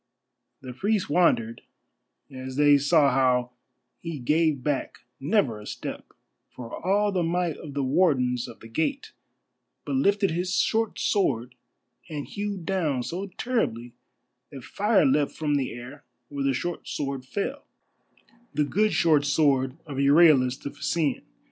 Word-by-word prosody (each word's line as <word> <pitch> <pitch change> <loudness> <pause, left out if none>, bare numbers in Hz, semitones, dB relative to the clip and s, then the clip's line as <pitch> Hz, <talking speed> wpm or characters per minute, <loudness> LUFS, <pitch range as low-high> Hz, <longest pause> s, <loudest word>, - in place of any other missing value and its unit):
The 130 -1 -8
priests 200 - -1
wondered 115 -10 +2 0.7
as 130 0 -7
they 145 0 +5
saw 145 0 +4
how 125 -2 +2 0.5
he 165 -2 -5
gave 150 +1 +1
back 145 -1 -2 0.2
never 140 - +1
a 105 - -11
step, - - -7 0.4
for 120 -2 -8
all 205 +3 +2
the 185 -2 0
might 170 -1 0
of 145 -3 -10
the 140 - 0
Wardens 130 -5 +1
of - - -12
the 115 - -11
Gate, 160 - -2 0.7
but - - -3
lifted 205 -7 +2
his 180 +2 -1
short 225 -1 0
sword 125 - 0 0.6
and 150 -3 -5
hewed 200 -4 -5
down 155 -10 0
so 185 +9 -4
terribly 120 - -2 0.6
that 135 -3 -10
fire 200 - +2
leapt 145 +1 +2
from 150 -2 -1
the 140 -3 0
air 125 +5 -10 0.3
where 140 -1 -3
the 135 - +2
short 175 +5 -4
sword 140 -2 -3
fell, 210 - -4 0.9
the 150 - +2
good 210 +8 +1
short 155 -4 +3
sword 140 -2 +2
of 140 -3 -7
Euryalus 140 -3 +5
the 140 - -7
Phæacian. 145 0 -1
145 Hz, 145 wpm, -26 LUFS, 130-180 Hz, 0.9 s, they